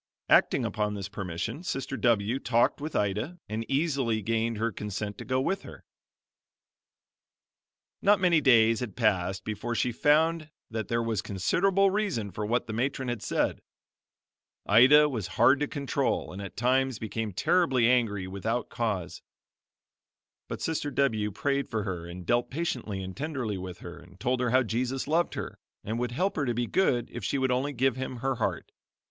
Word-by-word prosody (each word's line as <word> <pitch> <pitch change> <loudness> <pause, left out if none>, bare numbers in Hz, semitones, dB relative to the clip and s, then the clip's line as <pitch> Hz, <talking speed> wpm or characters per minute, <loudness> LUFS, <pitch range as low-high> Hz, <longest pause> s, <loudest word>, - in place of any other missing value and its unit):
Acting - - +4
upon 105 -1 -1
this 100 -2 -4
permission, 100 - -4
Sister 135 -6 -3
W 115 0 +1
talked 120 +2 +1
with 155 +1 -5
Ida 105 - -1
and 110 +2 -3
easily 135 -7 0
gained 115 +1 0
her 115 +2 0
consent 105 0 -5
to - - -7
go 130 0 0
with 190 +9 -1
her. - - -12 2.2
Not 205 0 +4
many 175 -4 +4
days 115 -4 +5
had 115 -6 -5
passed 95 -4 +1
before 110 +3 -3
she 125 - +1
found 155 +5 +2 0.2
that 110 -2 -3
there 115 0 0
was 110 -3 -1
considerable 190 - +2
reason 190 - -1
for 105 +3 -4
what 120 +3 0
the 110 - -6
matron 130 +2 -1
had 120 -3 -3
said. - - -1 1.0
Ida 135 +8 +7
was 115 -10 -3
hard 140 - +5
to 145 - 0
control 140 -7 -1
and 95 - -6
at 100 - -8
times 130 +1 +2
became 110 0 -4
terribly 130 - +2
angry 115 -6 +2
without 110 +6 -2
cause; 105 -7 -3 1.3
but - - -5
Sister 155 -3 -1
W 115 -7 +1
prayed 140 +6 -1
for 110 -2 -2
her 90 -4 -4
and 90 +1 -8
dealt 120 +5 +1
patiently 125 - -3
and 95 0 -7
tenderly 130 -9 -3
with 90 -1 -8
her 85 0 -9
and 90 +2 -17
told 125 +1 0
her 125 -1 +1
how 130 +2 +4
Jesus 125 +4 -2
loved 165 +3 +1
her, - - -6 0.2
and 110 +3 -3
would 120 -1 -2
help 190 +10 0
her 145 - +1
to 120 - 0
be 120 +1 0
good 120 -6 +1
if 120 - -7
she 140 - 0
would 130 -1 +1
only 130 +3 0
give 130 -1 +1
him 130 0 -4
her 130 +1 -2
heart. - - -2
120 Hz, 175 wpm, -28 LUFS, 105-135 Hz, 2.2 s, Ida